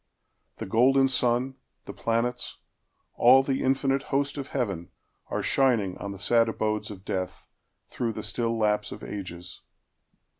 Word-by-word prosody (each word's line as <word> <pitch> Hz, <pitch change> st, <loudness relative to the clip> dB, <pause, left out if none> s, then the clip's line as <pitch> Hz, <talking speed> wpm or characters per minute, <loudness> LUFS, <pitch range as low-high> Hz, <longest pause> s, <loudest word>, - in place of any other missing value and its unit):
The -, -, -6 dB
golden 135 Hz, +6 st, +4 dB
sun, 130 Hz, +1 st, +1 dB, 0.3 s
The -, -, -7 dB
planets, 115 Hz, +2 st, -1 dB, 0.6 s
all 130 Hz, +3 st, +6 dB
the 135 Hz, 0 st, -1 dB
infinite 135 Hz, +1 st, +1 dB
host 140 Hz, 0 st, 0 dB
of 140 Hz, -2 st, -5 dB
heaven, 95 Hz, -10 st, -3 dB, 0.4 s
Are -, -, -2 dB
shining 115 Hz, -9 st, +2 dB
on 100 Hz, -, -5 dB
the 100 Hz, -, -7 dB
sad 115 Hz, +4 st, +3 dB
abodes 110 Hz, -1 st, -1 dB
of 100 Hz, -2 st, -10 dB
death, 95 Hz, -1 st, -4 dB, 0.4 s
Through 115 Hz, -2 st, -3 dB
the -, -, -6 dB
still 115 Hz, +2 st, -1 dB
lapse 105 Hz, -1 st, +1 dB
of -, -, -8 dB
ages. 90 Hz, -3 st, -7 dB
115 Hz, 145 wpm, -27 LUFS, 105-130 Hz, 0.6 s, all